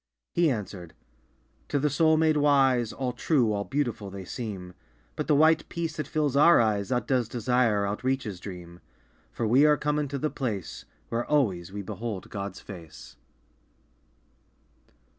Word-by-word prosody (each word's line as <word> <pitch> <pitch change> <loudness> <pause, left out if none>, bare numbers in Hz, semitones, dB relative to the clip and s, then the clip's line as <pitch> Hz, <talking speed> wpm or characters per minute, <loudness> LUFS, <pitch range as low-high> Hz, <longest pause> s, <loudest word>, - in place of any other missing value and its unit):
He 170 -2 +3
answered 100 - -5 0.7
"To 145 - 0
the 145 +1 +1
soul 160 +2 +4
made 155 -1 +3
wise 135 -5 +3
All 130 -2 -3
true, 120 -3 +1
all 100 0 -2
beautiful 115 -2 -2
they 95 -1 -8
seem. 95 -5 -6 0.4
But - - -3
the 150 - +4
white 160 +2 +4
peace 165 -1 -4
that 150 -3 -3
fills 150 -3 0
our 160 +4 +7
eyes 105 -4 +1
Outdoes 125 -1 0
desire, 120 -3 +1
outreaches 105 -1 -2
dream. 90 -2 -9 0.5
For 115 - -3
we 125 +6 +5
are 150 0 +4
come 150 0 0
unto 145 -1 -2
the 155 +3 -2
place 110 - -4 0.2
Where 115 +1 -1
always 95 - +1
we 100 0 -5
behold 105 0 -6
God's 100 -2 -5
face!" 85 -6 -11
120 Hz, 150 wpm, -27 LUFS, 100-145 Hz, 0.7 s, our